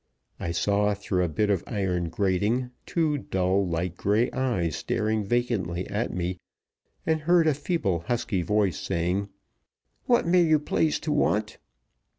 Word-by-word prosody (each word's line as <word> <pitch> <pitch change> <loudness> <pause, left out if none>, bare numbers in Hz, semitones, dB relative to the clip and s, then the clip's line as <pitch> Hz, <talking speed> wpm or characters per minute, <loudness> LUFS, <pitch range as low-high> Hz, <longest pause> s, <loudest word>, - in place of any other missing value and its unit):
I 85 - -3
saw, 100 +4 +1
through 95 -2 -1
a 85 - 0
bit 105 +7 +1
of 95 -4 0
iron 90 -5 -1
grating, 105 +8 0 0.2
two 155 -4 +1
dull, 95 -2 0
light 85 +1 -2
gray 105 +4 +1
eyes 115 - -1
staring 110 -1 -1
vacantly 100 -6 -1
at 105 +4 -1
me, 90 0 -3 0.7
and 160 -1 +1
heard 170 +1 +4
a 155 - +4
feeble 140 - -1
husky 115 -5 0
voice 100 +1 +1
saying: 95 +1 -1 0.8
"What 240 -1 +3
may 175 +1 +4
you 155 -2 +4
please 150 +1 0
to 155 - -2
want? 110 -7 0
105 Hz, 150 wpm, -26 LUFS, 90-130 Hz, 0.8 s, heard